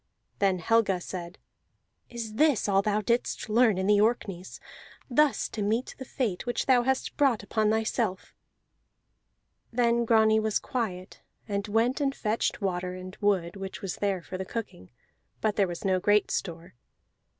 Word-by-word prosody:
Then 195 Hz, -2 st, +2 dB
Helga 200 Hz, 0 st, +2 dB
said: 175 Hz, 0 st, -7 dB, 0.7 s
"Is 230 Hz, -3 st, -6 dB
this 290 Hz, -2 st, +2 dB
all 195 Hz, -1 st, +3 dB
thou 210 Hz, +1 st, 0 dB
didst 235 Hz, +1 st, -1 dB
learn 220 Hz, -2 st, +4 dB
in 190 Hz, -, -1 dB
the 205 Hz, 0 st, +4 dB
Orkneys, 200 Hz, -5 st, -1 dB, 0.5 s
thus 300 Hz, +3 st, +3 dB
to 215 Hz, -, -5 dB
meet 220 Hz, +5 st, -1 dB
the 260 Hz, -, -6 dB
fate 235 Hz, -7 st, -3 dB
which 240 Hz, -1 st, -1 dB
thou 255 Hz, -2 st, +5 dB
hast 265 Hz, +2 st, -1 dB
brought 265 Hz, -8 st, +2 dB
upon 215 Hz, +1 st, +1 dB
thyself?" 220 Hz, -2 st, -1 dB, 1.4 s
Then 235 Hz, 0 st, +2 dB
Grani 220 Hz, -1 st, +4 dB
was 215 Hz, -1 st, +1 dB
quiet, 190 Hz, -7 st, -4 dB, 0.3 s
and 200 Hz, 0 st, -2 dB
went 230 Hz, +6 st, +1 dB
and 275 Hz, -1 st, 0 dB
fetched 215 Hz, 0 st, -1 dB
water, 180 Hz, -1 st, -2 dB
and 185 Hz, +1 st, -9 dB
wood 190 Hz, -4 st, 0 dB
which 195 Hz, 0 st, -7 dB
was 190 Hz, -, -4 dB
there 195 Hz, -4 st, -1 dB
for 185 Hz, -, -7 dB
the -, -, -2 dB
cooking 185 Hz, -, -7 dB, 0.5 s
(but 215 Hz, -2 st, 0 dB
there 200 Hz, -2 st, +2 dB
was 175 Hz, +2 st, -6 dB
no 190 Hz, -1 st, +2 dB
great 205 Hz, +2 st, +2 dB
store). 170 Hz, -2 st, -4 dB
210 Hz, 160 wpm, -28 LUFS, 190-235 Hz, 1.4 s, thou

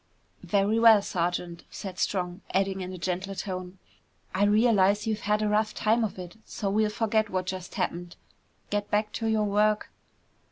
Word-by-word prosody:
"Very 205 Hz, +2 st, +1 dB
well, 225 Hz, -3 st, +7 dB
Sergeant!" 175 Hz, -1 st, -2 dB
said 190 Hz, -3 st, -7 dB
Strong, 180 Hz, -1 st, -1 dB
adding 195 Hz, 0 st, +1 dB
in 185 Hz, 0 st, -5 dB
a 185 Hz, -, -7 dB
gentler 185 Hz, +2 st, -3 dB
tone, 185 Hz, -1 st, -5 dB, 0.6 s
"I 205 Hz, -, +3 dB
realize 205 Hz, -1 st, +3 dB
you've 220 Hz, -1 st, -1 dB
had 210 Hz, 0 st, +2 dB
a -, -, +1 dB
rough 215 Hz, +1 st, +1 dB
time 225 Hz, +2 st, +2 dB
of 215 Hz, -, -3 dB
it, 180 Hz, +2 st, -9 dB
so 200 Hz, -2 st, -3 dB
we'll 215 Hz, +1 st, +2 dB
forget 220 Hz, 0 st, 0 dB
what 185 Hz, -1 st, -2 dB
just 185 Hz, -1 st, -6 dB
happened. 175 Hz, 0 st, -3 dB, 0.6 s
Get 205 Hz, 0 st, -1 dB
back 210 Hz, +1 st, +1 dB
to 225 Hz, -, -3 dB
your 220 Hz, -1 st, +2 dB
work." 210 Hz, +1 st, +1 dB
205 Hz, 170 wpm, -27 LUFS, 185-215 Hz, 0.6 s, well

